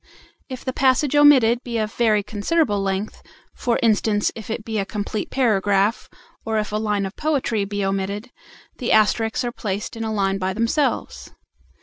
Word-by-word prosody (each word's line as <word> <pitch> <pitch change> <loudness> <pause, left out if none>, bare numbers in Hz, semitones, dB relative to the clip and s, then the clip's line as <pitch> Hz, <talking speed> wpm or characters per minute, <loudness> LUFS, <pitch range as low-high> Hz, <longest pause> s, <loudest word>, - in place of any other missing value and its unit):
If 255 -1 -7
the 260 - -2
passage 265 +2 +2
omitted 260 -5 +5
be 235 -2 -3
of 215 0 -2
very 215 -3 +2
considerable 210 +1 0
length, 195 +2 -3 0.3
for 240 -1 0
instance 210 -2 +2
if 225 -2 -10
it 225 0 -4
be 220 -2 -2
a - - +1
complete 205 +1 -4
paragraph, 205 -3 +1 0.3
or 220 -1 -1
if 210 -1 -2
a 210 - -1
line 210 -2 -1
of 195 - -7
poetry 270 -9 0
be 205 0 -2
omitted, 200 +4 -3 0.5
the 245 - -1
asterisks 220 +3 +2
are 240 - -2
placed 210 -1 -4
in 225 - -4
a 220 - -2
line 195 -2 0
by 185 0 -1
themselves. 230 +7 -1
220 Hz, 175 wpm, -22 LUFS, 205-240 Hz, 0.5 s, omitted